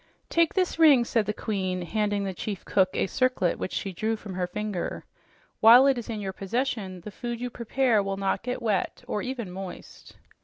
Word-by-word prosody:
"Take 335 +1 +2
this 365 -3 0
ring," 285 -7 +7
said 225 -3 0
the - - +1
Queen, 190 -4 -2
handing 205 +2 -1
the 195 -1 -3
chief 200 +2 -5
cook 190 -2 +3
a - - +1
circlet 255 -4 0
which - - -3
she 195 - -3
drew 220 +5 -1
from 205 -3 -8
her 180 -1 -2
finger. 210 -1 -4 0.5
"While 240 +4 +8
it 275 -1 +4
is 235 - -8
in 220 -2 -3
your 195 -2 -4
possession, 195 -3 -3
the 210 - -8
food 240 +3 -5
you 245 0 -4
prepare 235 -1 +1
will 195 0 -3
not 195 -1 0
get 250 0 -4
wet, 210 -4 -1
or 210 - -2
even 250 -7 -4
moist." 190 0 -9
210 Hz, 200 wpm, -27 LUFS, 190-245 Hz, 0.5 s, While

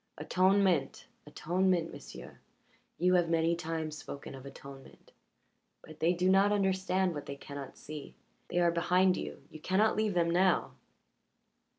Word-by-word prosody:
Atonement 185 -6 +2 0.2
atonement, 175 +2 0
m'sieu'. - - -11 0.6
You 180 +2 +2
have 175 -2 +3
many 165 0 +2
times 160 -2 -4
spoken 140 - -8
of 135 0 -10
atonement. 135 0 -13 0.7
But 155 -1 -13
they 170 +2 +3
do 180 +1 0
not 195 +2 +4
understand 190 -2 +1
what 145 - -7
they 140 - -5
cannot 140 -1 -9
see. 150 -1 -9 0.3
They - - -4
are 175 -1 +4
behind 180 +2 +3
you - - -6
you 155 - -10
cannot 200 +7 +2
leave 215 -3 0
them 170 -1 +2
now." 185 +1 +2
175 Hz, 145 wpm, -31 LUFS, 155-185 Hz, 0.7 s, not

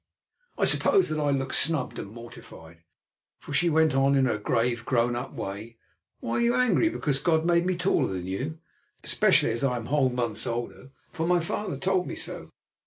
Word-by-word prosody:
I - - +2
suppose 390 -2 +3
that 155 - -2
I 145 -1 +1
looked 135 -1 -1
snubbed 150 -6 0
and 100 - -7
mortified, 105 -8 -12 0.6
for - - -9
she 175 +4 +3
went 160 -1 +3
on 135 +1 +3
in 135 -1 +3
her 110 -4 0
grave, 115 +2 0
grown 120 -1 +1
up 120 - -5
way: 105 +4 -7 0.4
"Why 115 - -2
are - - +1
you 235 0 +2
angry 250 +6 +3
because 145 - -1
God 160 +1 +1
made 170 0 +2
me 185 - +1
taller 170 - +1
than 90 -1 -4
you? 130 - -4 0.5
especially - - +3
as 115 +4 -3
I 130 -2 +1
am 115 - -6
whole 140 -1 +2
months 120 -3 -2
older, 120 +2 -5 0.2
for 160 - -3
my 180 0 +3
father 190 +5 -3
told 190 -1 0
me - - -5
so. - - -5
135 Hz, 195 wpm, -26 LUFS, 115-165 Hz, 0.6 s, suppose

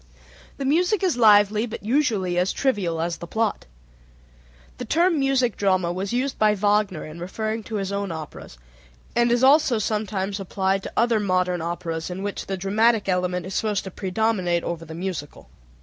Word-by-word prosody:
The 275 - -4
music 355 +8 +2
is 365 -7 +2
lively, 210 -1 +5
but 225 - -7
usually 220 -7 +1
as 180 +2 +1
trivial 195 -11 -1
as 170 0 -2
the 170 - -8
plot. 220 +3 -1 1.1
The - - -3
term 335 0 +2
music 265 -4 +1
drama 185 -3 +1
was 190 +2 -3
used 255 +3 -1
by 215 -1 +4
Wagner 205 -4 +1
in 155 +2 -9
referring 215 +5 -3
to 225 - -5
his 195 -1 -2
own 200 -2 -2
operas, 155 - -8 0.6
and 235 0 +3
is 240 +1 +2
also 275 -3 +5
sometimes 205 -2 -2
applied 195 0 -1
to - - -8
other 230 -1 +3
modern 185 -3 0
operas 165 -1 -4
in 185 +2 -5
which 205 0 -4
the 195 - -3
dramatic 215 +3 +2
element 180 -1 0
is 190 - -6
supposed 210 -1 0
to 190 - -7
predominate 185 -3 0
over 165 -1 -4
the 160 0 -9
musical. 175 -4 -6
200 Hz, 175 wpm, -23 LUFS, 180-230 Hz, 1.1 s, lively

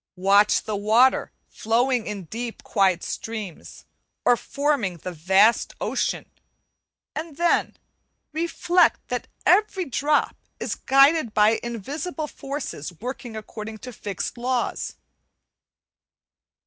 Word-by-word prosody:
Watch 200 +3 +4
the 215 - -3
water 220 +6 +3 0.2
flowing 240 +2 0
in 205 -2 -4
deep 230 +7 -6
quiet 190 -4 +2
streams, 215 -7 -6 0.4
or 245 - +6
forming 275 - -1
the 180 +3 -6
vast 190 +7 +3
ocean; - - -1 0.9
and 310 -2 -6
then 345 0 +1 0.6
reflect 340 +2 +2
that - - -3 0.2
every 385 -1 +3
drop 290 +3 +1 0.2
is - - -2
guided 275 -2 +4
by 215 +1 +4
invisible 285 - -4
forces 275 - -6
working 245 -1 -6
according 220 0 -7
to 250 +3 -9
fixed 205 +2 -5
laws. 245 0 -1
235 Hz, 105 wpm, -24 LUFS, 210-285 Hz, 0.9 s, or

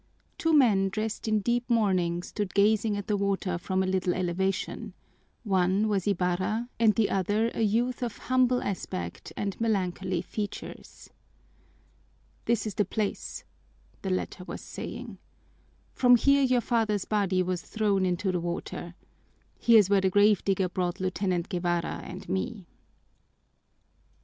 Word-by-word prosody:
Two 325 - +1
men 215 -10 +4
dressed 215 +3 -3
in 215 -1 +2
deep 240 +3 0
mourning 185 -7 +1
stood 205 0 -4
gazing 210 +1 +3
at 205 - -4
the 210 - 0
water 195 -3 -1
from 190 +2 0
a - - -1
little 185 -1 0
elevation: 185 +2 -2 0.5
one 190 0 +2
was 200 -2 0
Ibarra 190 +5 0
and 220 -2 +4
the 225 -3 +2
other 205 +4 +1
a - - -3
youth 235 +4 +1
of 235 -4 -3
humble 255 -1 +2
aspect 90 - -5
and 200 +1 -3
melancholy 185 -4 -1
features. 205 +1 -7 1.3
"This 230 -3 +1
is 215 - -3
the 205 - +2
place," 205 +1 -3 0.6
the 195 - -3
latter 185 0 -2
was - - -7
saying. - - -7 0.7
"From 245 -1 +6
here 280 +4 +4
your 255 -2 +3
father's 220 -5 0
body 195 -3 +1
was 180 -1 -2
thrown 205 -3 0
into 185 +1 0
the 180 - -1
water. 175 0 -5 0.6
Here's 225 -5 +6
where 200 -1 +3
the 190 - +2
grave 205 +1 +4
digger 195 -1 +1
brought 180 -1 -2
Lieutenant 185 -1 -1
Guevara 175 -1 -1
and 180 - -9
me." 195 +1 -3
200 Hz, 140 wpm, -28 LUFS, 185-220 Hz, 1.3 s, From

